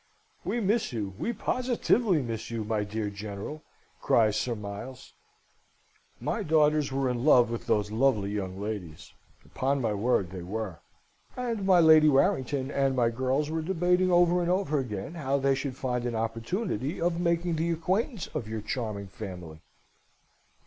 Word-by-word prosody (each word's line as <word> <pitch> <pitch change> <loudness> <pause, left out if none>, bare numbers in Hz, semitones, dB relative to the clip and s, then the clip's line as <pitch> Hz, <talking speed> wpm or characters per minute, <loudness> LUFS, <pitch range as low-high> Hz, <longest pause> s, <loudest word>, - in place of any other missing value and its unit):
"We 240 - -1
miss 215 +3 +1
you, 105 -5 -3
we 235 - -1
positively 235 - +1
miss 115 -2 -5
you, 115 -2 -3
my 105 -1 -1
dear 105 0 -3
General," 100 +8 -6 0.4
cries 110 -3 +3
Sir 120 +2 -1
Miles. 105 +5 -8 1.1
"My - - -2
daughters 150 -2 +3
were 135 0 0
in 125 -1 -1
love 125 -6 +5
with 115 - -5
those 105 -1 +1
lovely 110 -4 +2
young 95 -2 -4
ladies 100 -7 -6 0.3
upon 135 +2 -1
my 115 -4 0
word, 100 -4 +1
they 90 -1 -6
were; 95 -1 -5 0.6
and 230 -6 -2
my 185 -2 +6
Lady 155 -2 +7
Warrington 140 -3 +1
and 135 -1 +1
my 120 -2 +2
girls 130 +5 0
were 160 0 -1
debating 180 +2 +2
over 175 0 +4
and 175 - -1
over 180 -5 +1
again 105 - -4
how 140 -5 -1
they 140 0 +2
should 135 -1 -3
find 125 -2 -2
an 120 - -3
opportunity 115 - -2
of 170 0 0
making 170 -1 0
the 165 +2 0
acquaintance 185 - -1
of 135 -8 -3
your 110 0 -4
charming 105 -2 -4
family. 90 -6 -9
130 Hz, 160 wpm, -28 LUFS, 110-165 Hz, 1.1 s, Lady